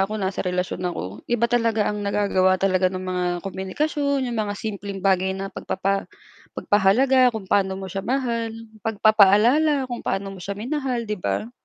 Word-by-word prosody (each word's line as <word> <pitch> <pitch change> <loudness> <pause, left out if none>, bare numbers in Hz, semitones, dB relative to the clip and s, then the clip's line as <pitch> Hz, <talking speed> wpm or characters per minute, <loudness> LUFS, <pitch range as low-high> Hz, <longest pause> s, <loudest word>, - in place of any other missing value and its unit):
ako 210 +3 0
nasa 190 -2 -2
relasyon 180 -1 -2
ako, 100 - -6
iba 235 -1 +1
talaga 230 -3 +2
ang 210 - -4
nagagawa 200 -2 +2
talaga 185 -1 +2
ng 185 0 -5
mga 180 -1 -2 0.2
komunikasyon 280 +9 -1
'yong 235 -2 -3
mga 205 -1 -1
simpleng 200 -2 -5
bagay 190 -1 +2
na 195 0 -5
pagpapa 195 +1 -2 0.5
pagpahalaga 250 +6 +4
kung 200 -4 -5
paano 190 -2 +2
mo 190 - -6
siya 195 +1 -4
mahal, 235 -3 -1 0.4
pagpapaalala 225 +7 +4
kung 240 - -5
paano 195 0 -2
mo - - -11
siya 200 - -4
minahal 255 0 -2
'di 210 - -2
ba? 215 +5 -2
205 Hz, 165 wpm, -23 LUFS, 190-235 Hz, 0.5 s, pagpahalaga